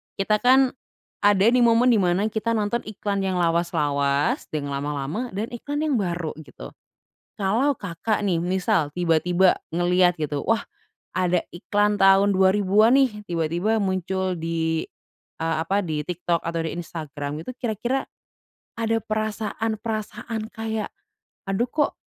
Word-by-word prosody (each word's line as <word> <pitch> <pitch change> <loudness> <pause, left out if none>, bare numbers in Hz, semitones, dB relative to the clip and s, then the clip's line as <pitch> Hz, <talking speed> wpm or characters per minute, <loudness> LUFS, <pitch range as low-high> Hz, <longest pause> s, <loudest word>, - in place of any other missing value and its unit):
kita 210 +2 +1
kan 260 +2 +5 0.5
ada 205 -2 +5
di 250 - +4
momen 240 +1 +5
di 225 - +4
mana 185 +3 +2
kita 230 +1 -1
nonton 215 +2 0
iklan 205 -1 -3
yang 190 -1 -1
lawas-lawas, 145 -5 +1
yang 145 -2 -3
lama-lama 145 - -3
dan 215 +4 -3
iklan 290 +5 -3
yang 290 -6 +1
baru, 175 -4 -2
gitu. 155 - -11 0.7
Kalau 230 +7 +1
Kakak, 205 +3 -2
nih, 175 -4 +1
misal, 185 -2 +1
tiba-tiba 175 +2 +3
ngelihat, 175 +1 +2
gitu, 150 -2 -2
"Wah, 225 +6 0 0.5
ada 180 -1 +1
iklan 205 +3 0
tahun 195 +1 +6
2000-an 200 +5 +4
nih." 245 -6 +2
Tiba-tiba 175 +6 0
muncul 190 -1 -1
di, 165 -1 -1 0.6
eee, 165 0 -1
apa, 195 +4 0
di 155 -2 -2
TikTok 175 +1 -2
atau 165 0 -3
di 160 - -3
Instagram, 155 -3 -5
gitu, 255 - -5
kira-kira 240 +2 -1 0.8
ada 225 0 +1
perasaan-perasaan 220 +1 -3
kayak, 220 -1 -3 0.6
"Aduh 215 +6 0
kok, 295 +4 0
195 Hz, 135 wpm, -24 LUFS, 170-220 Hz, 0.8 s, tahun